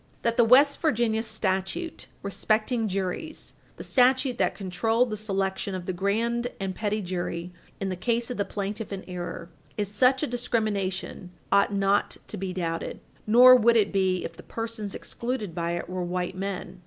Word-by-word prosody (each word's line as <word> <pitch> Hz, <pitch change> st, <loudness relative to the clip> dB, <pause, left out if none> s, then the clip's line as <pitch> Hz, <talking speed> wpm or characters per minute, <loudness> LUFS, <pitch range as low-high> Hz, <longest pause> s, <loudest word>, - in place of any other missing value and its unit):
That 230 Hz, 0 st, +1 dB
the 235 Hz, -, +5 dB
West 275 Hz, +5 st, +5 dB
Virginia 230 Hz, -7 st, +2 dB
statute 220 Hz, -, -2 dB, 0.2 s
respecting 220 Hz, +3 st, 0 dB
juries 195 Hz, -, -4 dB, 0.2 s
the -, -, -7 dB
statute 255 Hz, 0 st, +3 dB
that -, -, +1 dB
controlled 225 Hz, +5 st, 0 dB
the -, -, -1 dB
selection 195 Hz, -2 st, -2 dB
of 180 Hz, -1 st, -5 dB
the 185 Hz, -, -2 dB
grand 230 Hz, +6 st, 0 dB
and 195 Hz, -1 st, -2 dB
petit 210 Hz, +1 st, -2 dB
jury 175 Hz, -1 st, -3 dB, 0.3 s
in 195 Hz, -, -2 dB
the 185 Hz, -, -2 dB
case 235 Hz, +5 st, -1 dB
of -, -, -4 dB
the 200 Hz, -, +1 dB
plaintiff 205 Hz, +2 st, -4 dB
in 195 Hz, -1 st, -5 dB
error 175 Hz, -1 st, -6 dB, 0.3 s
is 205 Hz, -1 st, -2 dB
such 255 Hz, +6 st, +3 dB
a -, -, +3 dB
discrimination 215 Hz, -7 st, -2 dB, 0.2 s
ought 200 Hz, 0 st, +4 dB
not 200 Hz, 0 st, +1 dB
to -, -, -5 dB
be 190 Hz, 0 st, -3 dB
doubted. 170 Hz, -2 st, -3 dB, 0.3 s
Nor 250 Hz, +3 st, +9 dB
would 235 Hz, -1 st, +5 dB
it 205 Hz, -2 st, +2 dB
be 185 Hz, -2 st, +1 dB
if 165 Hz, -, -6 dB
the 175 Hz, -, -11 dB
persons 225 Hz, -2 st, -5 dB
excluded 235 Hz, -7 st, -4 dB
by 170 Hz, 0 st, -2 dB
it 175 Hz, -, -3 dB
were 185 Hz, +1 st, -3 dB
white 180 Hz, +1 st, -2 dB
men. 190 Hz, -1 st, -5 dB
205 Hz, 175 wpm, -27 LUFS, 185-235 Hz, 0.3 s, Nor